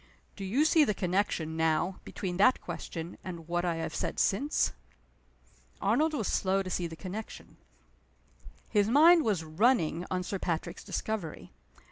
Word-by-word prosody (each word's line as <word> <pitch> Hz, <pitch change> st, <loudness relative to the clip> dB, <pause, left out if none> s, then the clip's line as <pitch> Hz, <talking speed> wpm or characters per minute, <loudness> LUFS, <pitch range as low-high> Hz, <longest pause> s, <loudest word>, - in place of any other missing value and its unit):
Do 200 Hz, -, -7 dB
you 240 Hz, +11 st, +2 dB
see 315 Hz, 0 st, +5 dB
the 210 Hz, -8 st, +1 dB
connection, 180 Hz, -4 st, -1 dB
now, 160 Hz, +3 st, +1 dB
between 180 Hz, -3 st, -5 dB
that 210 Hz, +6 st, +5 dB
question, 165 Hz, 0 st, -7 dB
and 170 Hz, -3 st, -7 dB
what 175 Hz, 0 st, -1 dB
I 175 Hz, -2 st, 0 dB
have 165 Hz, -, -4 dB
said -, -, -3 dB
since?" 280 Hz, +10 st, +1 dB, 1.1 s
Arnold 315 Hz, +1 st, +2 dB
was 220 Hz, -8 st, -1 dB
slow 195 Hz, 0 st, +1 dB
to 185 Hz, -, -6 dB
see 175 Hz, -1 st, -1 dB
the 165 Hz, -, -9 dB
connection. 200 Hz, +5 st, -8 dB, 1.1 s
His 205 Hz, -2 st, +2 dB
mind 320 Hz, +6 st, +7 dB
was 200 Hz, -7 st, 0 dB
running 175 Hz, 0 st, +1 dB
on 185 Hz, 0 st, -1 dB
Sir 195 Hz, +2 st, -4 dB
Patrick's 170 Hz, -3 st, -3 dB
discovery. 205 Hz, -8 st, -4 dB
185 Hz, 150 wpm, -30 LUFS, 170-220 Hz, 1.1 s, mind